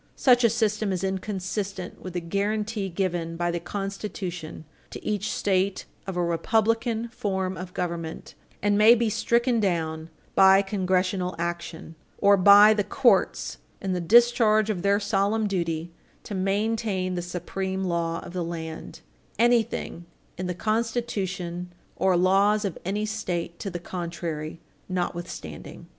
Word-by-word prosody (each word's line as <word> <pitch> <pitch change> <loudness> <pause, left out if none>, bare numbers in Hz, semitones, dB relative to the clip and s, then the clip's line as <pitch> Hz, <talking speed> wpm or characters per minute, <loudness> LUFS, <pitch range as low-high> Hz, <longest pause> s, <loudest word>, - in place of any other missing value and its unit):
Such 250 -2 +4
a 230 - +6
system 215 -2 0
is 185 0 -2
inconsistent 190 0 -3
with 185 - -7
the 175 - -2
guarantee 205 +3 -1
given 170 -2 -2
by 175 0 0
the 170 - -2
Constitution 185 -3 -5 0.2
to - - -9
each 210 0 -1
State 190 -1 0 0.2
of 190 -2 -4
a 175 - +1
republican 225 +6 +1
form 190 -5 -2
of 180 0 -8
government, 170 -2 -4 0.3
and 205 0 +3
may 220 +3 +8
be 230 -2 0
stricken 235 +2 +2
down 165 -5 -1 0.2
by 195 +1 +6
Congressional 185 -1 0
action, 170 -1 -5 0.2
or 200 0 +5
by 205 +3 +8
the 210 -1 0
courts 255 +4 +2 0.2
in 190 -2 -2
the 180 - -1
discharge 220 +1 +5
of 185 -4 -3
their 200 +1 +3
solemn 205 +1 +1
duty 170 -4 -2 0.3
to 210 - -7
maintain 195 -1 0
the 175 - -2
supreme 190 +2 -4
law 170 -2 -1
of 175 - -10
the 180 -1 -2
land, 160 -1 -6 0.4
anything 230 -6 +1 0.3
in 185 0 -4
the 180 - -3
constitution 195 -6 -2 0.2
or 190 -2 +2
laws 200 +4 +3
of 190 - -2
any 205 +4 -1
State 180 -6 -3
to 195 - -4
the 175 - -4
contrary 170 -3 -5 0.3
notwithstanding. 180 -1 -5
190 Hz, 140 wpm, -26 LUFS, 175-210 Hz, 0.4 s, may